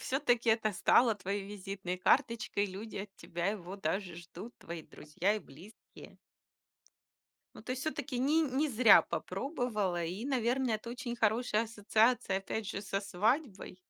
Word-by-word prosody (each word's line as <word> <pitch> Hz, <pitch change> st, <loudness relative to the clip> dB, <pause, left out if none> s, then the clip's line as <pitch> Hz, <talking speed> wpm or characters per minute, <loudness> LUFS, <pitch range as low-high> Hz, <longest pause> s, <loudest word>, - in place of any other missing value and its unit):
всё-таки 245 Hz, -4 st, +1 dB
это 220 Hz, -1 st, +3 dB
стало 230 Hz, +5 st, +4 dB
твоей 200 Hz, 0 st, -3 dB
визитной 195 Hz, -2 st, -5 dB
карточкой, 230 Hz, -3 st, +2 dB
люди 205 Hz, +3 st, -8 dB
от 195 Hz, 0 st, -6 dB
тебя 170 Hz, +1 st, -4 dB
его 195 Hz, -2 st, -5 dB
даже 190 Hz, 0 st, -2 dB
ждут, 175 Hz, +7 st, -10 dB
твои 170 Hz, 0 st, -7 dB
друзья 170 Hz, +9 st, -2 dB
и -, -, -2 dB
близкие. 180 Hz, +5 st, -15 dB, 1.4 s
Ну, -, -, -11 dB
то -, -, -8 dB
есть 260 Hz, +1 st, -4 dB
всё-таки 285 Hz, -5 st, -3 dB
не 305 Hz, +5 st, +3 dB
не 290 Hz, +1 st, 0 dB
зря 245 Hz, -1 st, +7 dB
попробовала, 215 Hz, -, -2 dB
и, 185 Hz, +8 st, -4 dB
наверное, 250 Hz, -2 st, +1 dB
это 225 Hz, +2 st, -9 dB
очень 245 Hz, -1 st, -5 dB
хорошая 225 Hz, 0 st, +2 dB
ассоциация, 220 Hz, -1 st, +2 dB
опять 210 Hz, +2 st, -4 dB
же, 200 Hz, -1 st, -4 dB
со 195 Hz, -1 st, -2 dB
свадьбой. 205 Hz, -, -1 dB
215 Hz, 145 wpm, -32 LUFS, 195-245 Hz, 1.4 s, зря